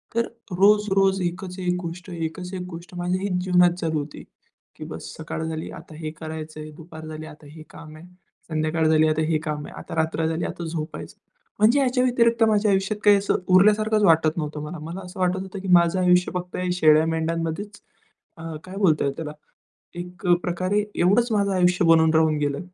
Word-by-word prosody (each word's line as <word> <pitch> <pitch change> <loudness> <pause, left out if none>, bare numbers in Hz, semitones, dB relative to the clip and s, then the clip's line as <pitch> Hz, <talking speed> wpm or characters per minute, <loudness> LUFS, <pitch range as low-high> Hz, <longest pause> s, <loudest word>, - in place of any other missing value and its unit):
तर 235 - +1 0.2
रोज-रोज 195 0 +3
एकच 180 +1 -4
एक 180 -1 0
गोष्ट, 175 +2 -7
एकच 175 +2 -5
एक 185 - -4
गोष्ट 170 +1 -10
माझ्या 180 +1 -1
हीच 180 -2 -1
जीवनात 180 -1 +4
चालू 160 -2 0
होती 145 0 -8 0.5
की - - -9
बस - - -8
सकाळ 160 0 -5
झाली, 160 0 -5
आता 160 -2 -11
हे 155 -1 -5
करायचंय. 155 -1 -7
दुपार 160 -1 -11
झाली, 155 0 -7
आता 150 -1 -14
हे 155 0 -11
काम 155 -1 -12
आहे. 165 - -13 0.4
संध्याकाळ 155 +1 0
झाली, 155 0 +4
आता 155 0 +1
हे 155 - +3
काम 150 -2 -4
आहे. - - -12
आता - - -8
रात्र 160 0 0
झाली, 160 +1 -2
आता 170 - -5
झोपायचं. 160 -1 -6 0.4
म्हणजे 230 +7 +5
याच्या 255 -1 +2
व्यतिरिक्त 235 -2 +2
माझ्या 210 0 +2
आयुष्यात 195 +2 0
काही 205 -1 +7
असं 200 - 0 0.2
उरल्यासारखंच 215 +2 +4
वाटत 160 -2 +4
नव्हतं 150 -1 -3
मला. 155 +2 -7
मला 170 +4 -6
असं 180 +1 -11
वाटत 185 +1 +1
होतं 190 0 -7
की, 190 - -7
माझं 170 +1 +4
आयुष्य 180 0 +3
फक्त 180 0 -4 0.2
शेळ्या-मेंढ्यांमध्येच, 165 +4 +1 0.6
अ, - - -10 0.2
काय 185 +1 -9
बोलताय 155 -8 +2
त्याला, 150 -2 -5 0.7
एकप्रकारे 180 +2 0
एवढंच 220 +7 +3
माझं 200 -1 +1
आयुष्य 180 -1 +3
बनून 160 -1 +5
राहून 160 -1 +3
गेलं 145 -1 -1
175 Hz, 180 wpm, -23 LUFS, 160-190 Hz, 0.7 s, काही